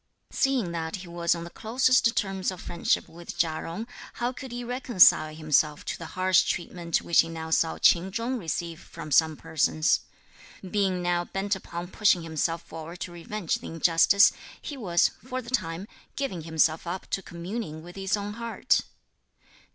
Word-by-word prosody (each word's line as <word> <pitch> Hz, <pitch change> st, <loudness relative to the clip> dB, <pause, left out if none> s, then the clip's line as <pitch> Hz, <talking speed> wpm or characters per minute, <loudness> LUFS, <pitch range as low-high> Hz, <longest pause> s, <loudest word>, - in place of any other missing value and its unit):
Seeing 265 Hz, -, +1 dB
that 165 Hz, -1 st, -3 dB
he 185 Hz, -2 st, -8 dB
was 170 Hz, 0 st, 0 dB
on 170 Hz, -, -6 dB
the 170 Hz, -, -9 dB
closest 245 Hz, +1 st, +2 dB
terms 195 Hz, -2 st, 0 dB
of 185 Hz, -2 st, -6 dB
friendship 170 Hz, -1 st, 0 dB
with 170 Hz, +1 st, -10 dB
Chia 160 Hz, -2 st, 0 dB
Jung, 175 Hz, +7 st, -5 dB, 0.3 s
how 240 Hz, +1 st, -1 dB
could 260 Hz, 0 st, -9 dB
he 245 Hz, 0 st, -4 dB
reconcile 240 Hz, -10 st, +5 dB
himself 150 Hz, -1 st, +1 dB
to -, -, -3 dB
the 165 Hz, -, -6 dB
harsh 185 Hz, 0 st, +5 dB
treatment 170 Hz, -1 st, -2 dB
which 170 Hz, -, +3 dB
he 165 Hz, -, +4 dB
now 160 Hz, -1 st, -6 dB
saw 160 Hz, 0 st, +2 dB
Ch'in 185 Hz, +2 st, +4 dB
Chung 235 Hz, +5 st, -2 dB
receive 170 Hz, -2 st, -3 dB
from 155 Hz, -, -10 dB
some 160 Hz, +1 st, +4 dB
persons? 155 Hz, +1 st, +2 dB, 0.7 s
Being 190 Hz, -2 st, 0 dB
now 175 Hz, 0 st, +1 dB
bent 195 Hz, +2 st, -1 dB
upon 175 Hz, -2 st, -7 dB
pushing 190 Hz, -4 st, +3 dB
himself 165 Hz, +1 st, -1 dB
forward 165 Hz, +2 st, -9 dB
to 175 Hz, -, -4 dB
revenge 175 Hz, +1 st, -3 dB
the -, -, -9 dB
injustice, 165 Hz, +4 st, +5 dB, 0.3 s
he 290 Hz, -, -6 dB
was, 180 Hz, -9 st, +2 dB
for 255 Hz, +1 st, -4 dB
the 240 Hz, -1 st, -9 dB
time, 170 Hz, -5 st, -2 dB, 0.3 s
giving 190 Hz, -, -3 dB
himself 160 Hz, 0 st, +1 dB
up 185 Hz, +2 st, -4 dB
to 195 Hz, -, 0 dB
communing 170 Hz, -2 st, -6 dB
with 175 Hz, +1 st, -11 dB
his 195 Hz, +1 st, 0 dB
own 205 Hz, 0 st, -4 dB
heart. 235 Hz, +1 st, +1 dB
175 Hz, 175 wpm, -27 LUFS, 165-210 Hz, 0.7 s, reconcile